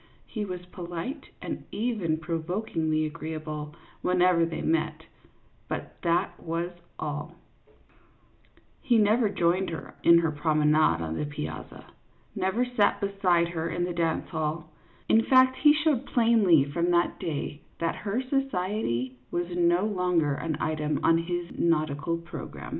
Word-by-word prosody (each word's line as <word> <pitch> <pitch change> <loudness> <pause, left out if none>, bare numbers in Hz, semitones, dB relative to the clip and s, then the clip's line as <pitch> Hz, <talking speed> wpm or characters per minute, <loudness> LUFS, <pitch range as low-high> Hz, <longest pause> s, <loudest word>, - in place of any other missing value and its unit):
He 215 -2 -4
was 180 -2 -6
polite 180 - -6 0.2
and - - -5
even 210 -9 -1
provokingly 160 -1 -1
agreeable 155 -1 -5 0.3
whenever 180 -2 +3
they 165 - -4
met, 160 0 0 0.6
but - - -5
that 170 0 0
was 170 +2 -3 0.3
all; 150 -1 -4 1.5
he 245 -5 +3
never 215 +1 +4
joined 180 0 +1
her 165 - -7
in 170 0 +7
her 165 -1 +2
promenade 150 - +2
on 80 0 -3
the - - -1
piazza, 150 +1 -7 0.5
never 195 +5 +1
sat 245 -4 +2
beside 185 -4 +2
her 165 -1 -3
in 175 - -1
the 175 0 -2
dance 165 -1 0
hall; 155 0 -3 0.4
in 225 - +5
fact, 260 +1 +5
he 295 - +6
showed 295 -4 +1
plainly 225 - +4
from 170 +5 -1
that 175 0 +2
day 155 -3 -4 0.2
that 165 0 -1
her 215 +5 -2
society 185 - -1
was 175 0 -2
no 175 +2 +3
longer 180 -7 +1
an 155 +1 -3
item 150 -1 -1
on 165 0 +5
his 175 0 -3
nautical 155 0 +1
program. 170 0 -8
170 Hz, 135 wpm, -27 LUFS, 155-200 Hz, 1.5 s, in